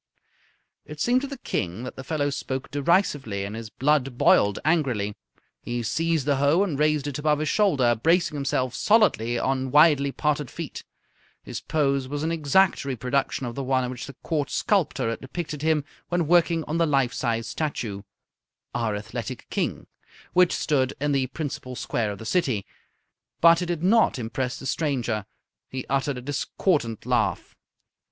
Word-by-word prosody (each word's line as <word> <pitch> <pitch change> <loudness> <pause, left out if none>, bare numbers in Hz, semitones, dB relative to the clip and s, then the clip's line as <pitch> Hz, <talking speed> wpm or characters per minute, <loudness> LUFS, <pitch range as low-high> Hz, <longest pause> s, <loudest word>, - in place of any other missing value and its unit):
It 150 0 -10
seemed 245 - +3
to 280 - -3
the 275 0 -7
King 95 - -3
that 125 - -6
the 130 - -7
fellow 145 0 -1
spoke 135 -1 -4
derisively, 145 - +1
and 100 +2 -6
his 115 -1 -7
blood 135 -1 +1
boiled 100 -4 +4
angrily. 130 -11 +1 0.5
He 120 0 -3
seized 165 +4 0
the 145 -2 +2
hoe 145 +7 +3
and 160 -8 -2
raised 150 -2 +2
it 145 -1 -4
above 150 0 +2
his 155 0 -1
shoulder, 140 - +3
bracing 165 +9 +2
himself 130 -3 -1
solidly 155 - +3
on 130 +1 0
widely 145 -1 +5
parted 150 -2 -1
feet. - - -7 0.6
His - - -6
pose 140 -4 0
was 145 +2 -3
an 160 - 0
exact 165 +4 +3
reproduction 130 +1 -1
of 120 - -4
the 140 - -4
one 130 -1 +1
in 125 - -3
which 125 -2 -7
the 140 - -10
Court 150 -3 -1
sculptor 195 - +1
had 115 - -5
depicted 150 +1 -5
him 155 -2 +1 0.2
when 175 -1 +1
working 170 0 +3
on 160 +3 -2
the 165 - +3
life 135 -4 +2
size 115 -2 -1
statue 115 -10 -3 0.7
("Our 115 -3 -1
Athletic 105 0 -6
King") - - -2 0.5
which 180 -1 +5
stood 135 -3 0
in 145 +1 0
the 135 -2 +1
principal 130 -3 -5
square 115 -2 -1
of 100 - -6
the 110 - -9
city; 130 - 0 0.7
but 170 +1 +6
it 180 - -2
did 170 -2 -2
not 220 -1 +4
impress 125 +2 -3
the - - -9
stranger. 120 -9 -1 0.4
He 130 -1 -5
uttered 135 0 0
a - - -6
discordant 145 - -1
laugh. - - 0
140 Hz, 170 wpm, -25 LUFS, 125-160 Hz, 0.7 s, but